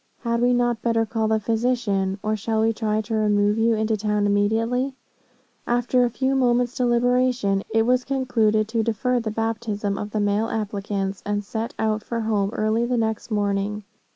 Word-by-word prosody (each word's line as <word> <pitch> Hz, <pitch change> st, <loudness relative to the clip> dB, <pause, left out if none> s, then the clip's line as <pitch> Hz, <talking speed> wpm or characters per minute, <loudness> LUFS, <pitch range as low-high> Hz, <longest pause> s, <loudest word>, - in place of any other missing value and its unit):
Had 235 Hz, -1 st, -1 dB
we 245 Hz, +1 st, +4 dB
not 240 Hz, -2 st, +1 dB
better 230 Hz, -1 st, +1 dB
call 220 Hz, 0 st, -1 dB
the 220 Hz, 0 st, +2 dB
physician? 220 Hz, -4 st, 0 dB
Or 215 Hz, 0 st, 0 dB
shall 220 Hz, +1 st, -1 dB
we 225 Hz, +1 st, +2 dB
try 215 Hz, -1 st, -1 dB
to 220 Hz, +1 st, -6 dB
remove 210 Hz, 0 st, +2 dB
you 225 Hz, 0 st, +3 dB
into 220 Hz, 0 st, 0 dB
town 210 Hz, 0 st, 0 dB
immediately?' 225 Hz, +6 st, +1 dB, 0.7 s
After 245 Hz, +1 st, +2 dB
a 245 Hz, -, +2 dB
few 260 Hz, +3 st, -1 dB
moments' 245 Hz, -2 st, +2 dB
deliberation, 245 Hz, -4 st, +2 dB
it 225 Hz, 0 st, +2 dB
was 250 Hz, +1 st, +2 dB
concluded 230 Hz, -6 st, +1 dB
to 225 Hz, 0 st, 0 dB
defer 235 Hz, +3 st, 0 dB
the 225 Hz, -2 st, -3 dB
baptism 215 Hz, -2 st, -2 dB
of 210 Hz, -, -4 dB
the 215 Hz, -, -2 dB
male 205 Hz, +2 st, +1 dB
applicants, 200 Hz, -2 st, -3 dB
and 205 Hz, 0 st, -2 dB
set 225 Hz, +2 st, -4 dB
out 215 Hz, -1 st, 0 dB
for 230 Hz, +1 st, -4 dB
home 210 Hz, -3 st, 0 dB
early 215 Hz, +2 st, +1 dB
the 245 Hz, 0 st, 0 dB
next 220 Hz, -1 st, -2 dB
morning. 205 Hz, 0 st, -1 dB
220 Hz, 180 wpm, -23 LUFS, 210-240 Hz, 0.7 s, we